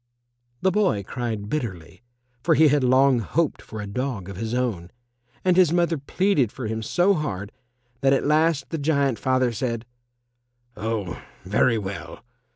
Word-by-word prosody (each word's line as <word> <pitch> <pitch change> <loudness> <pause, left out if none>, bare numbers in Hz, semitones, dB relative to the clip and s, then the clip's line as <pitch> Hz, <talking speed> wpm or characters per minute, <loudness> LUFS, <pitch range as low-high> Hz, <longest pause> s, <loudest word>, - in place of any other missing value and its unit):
The 190 - +4
boy 185 - +1
cried 110 -1 -4
bitterly, 105 - -5 0.4
for - - +3
he 155 +1 +6
had 145 -1 +2
long 130 0 +4
hoped 155 +8 -1
for 110 - -9
a 105 - -4
dog 100 -2 -4
of 100 - -7
his 110 +4 -4
own, 110 -9 -2 0.6
and 180 -1 +4
his 180 -4 +5
mother 170 -2 +1
pleaded 145 - +1
for 130 - -6
him 110 +1 -3
so 175 - +2
hard 110 - -3 0.5
that 135 +1 +3
at 135 - +2
last 155 -1 +2
the 165 - -2
giant 140 -5 +1
father 130 0 +2
said, 115 0 -3 0.9
"Oh, 105 -4 -3 0.2
very 110 +4 +2
well. 100 -1 -6
125 Hz, 160 wpm, -24 LUFS, 110-150 Hz, 0.9 s, he